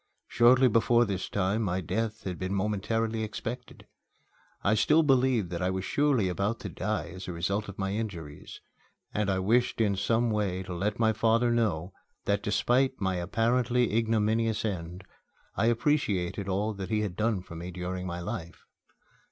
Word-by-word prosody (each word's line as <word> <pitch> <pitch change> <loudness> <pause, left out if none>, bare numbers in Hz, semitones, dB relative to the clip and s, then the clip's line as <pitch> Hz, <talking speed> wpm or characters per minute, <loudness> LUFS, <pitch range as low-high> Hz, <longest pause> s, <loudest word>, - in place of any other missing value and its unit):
Shortly 125 +2 +5
before 120 +1 +4
this 95 -3 -3
time 100 +3 0
my 95 -3 0
death 110 +5 -3
had 90 -3 -5
been 95 +2 -2
momentarily 110 +3 -1
expected. 120 +3 -6 0.8
I 100 - +3
still 155 +8 +4
believed 130 - +2
that 85 0 -3
I 90 - +1
was 95 0 -2
surely 140 -9 +2
about 100 +5 -1
to - - -5
die 90 -7 -3
as 90 +2 -8
a - - -3
result 100 +5 -2
of 100 - -9
my 95 0 -2
injuries, 85 -9 -6 0.5
and 105 -1 0
I 95 - +1
wished 115 +7 +1
in 105 -3 +2
some 115 +4 +1
way 100 -3 -1
to 90 - -6
let 100 +4 -1
my 110 -1 +3
father 115 +2 +2
know 95 -7 0 0.3
that, 100 0 +1
despite 125 +6 +1
my 95 -2 0
apparently 120 +5 +1
ignominious 110 0 +1
end, 90 -2 -4 0.5
I 115 - +2
appreciated 105 -7 0
all 105 +3 0
that 95 -2 -6
he 110 -1 +1
had 100 -4 -3
done 110 -2 0
for 85 - -11
me 85 +2 -6
during 90 +1 -4
my 85 0 -4
life. 85 -3 -6
105 Hz, 170 wpm, -28 LUFS, 95-115 Hz, 0.8 s, Shortly